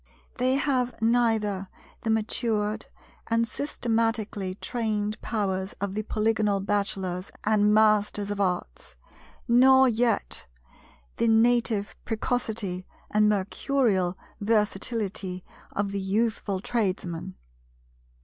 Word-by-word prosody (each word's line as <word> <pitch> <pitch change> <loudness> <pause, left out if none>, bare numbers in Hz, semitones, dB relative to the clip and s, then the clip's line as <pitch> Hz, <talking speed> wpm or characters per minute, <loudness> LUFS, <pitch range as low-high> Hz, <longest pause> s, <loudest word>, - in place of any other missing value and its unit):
They 255 +1 +3
have 255 -3 0
neither 220 -4 +1 0.3
the 225 - -3
matured 220 -1 0 0.4
and 230 0 +2
systematically 225 -7 -1
trained 215 -1 -2
powers 190 -3 -2
of 200 0 -4
the 215 - -1
Polygonal 215 -1 +1
Bachelors 195 -2 -2
and 210 -1 +3
Masters 210 -1 +3
of 205 0 -2
Arts, 65 - -3 0.5
nor 265 +2 +6
yet 235 -2 0 0.7
the - - +2
native 225 -2 +3
precocity 220 -5 -2 0.2
and 210 0 +4
mercurial 200 -1 +1 0.2
versatility 210 -3 -1 0.3
of 200 0 -1
the 200 - -2
youthful 200 -1 0
Tradesman. 185 - -2
210 Hz, 95 wpm, -27 LUFS, 195-230 Hz, 0.7 s, nor